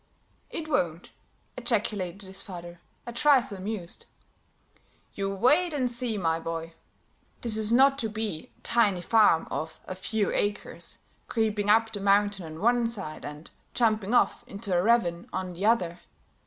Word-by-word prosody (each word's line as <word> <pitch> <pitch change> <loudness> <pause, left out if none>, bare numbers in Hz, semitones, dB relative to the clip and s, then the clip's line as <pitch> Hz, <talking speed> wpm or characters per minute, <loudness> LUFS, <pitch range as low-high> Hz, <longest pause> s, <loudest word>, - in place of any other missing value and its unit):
"It 315 - -5
won't!" 175 - -1 0.4
ejaculated 205 -6 -2
his 190 0 -6
father, 175 -2 -9 0.3
a 240 - -6
trifle 255 -4 +3
amused. 190 -2 -6 1.1
"You 195 -1 -2
wait 295 - +3
and 255 -3 +1
see, 240 -2 +1
my 165 -3 +1
boy. 165 0 -5 0.7
This 230 -3 0
is 215 0 -1
not 270 +3 +5
to 225 - 0
be 215 -7 -4
a - - -31
tiny 205 -6 +2
farm 210 -4 +4
of 160 0 -4
a - - -5
few 200 +2 -1
acres, 205 0 -2 0.3
creeping 215 -3 0
up 225 +1 +4
the 205 - -4
mountain 200 -2 +2
on 160 +1 -9
one 240 +1 +3
side 195 -9 -6
and 150 +2 -8 0.2
jumping 220 -1 +2
off 245 - +3
into 200 -5 -3
a 175 - +4
ravine 180 -5 +2
on 185 -1 -3
the 190 +5 -1
other. 180 -7 +2
205 Hz, 155 wpm, -28 LUFS, 180-235 Hz, 1.1 s, not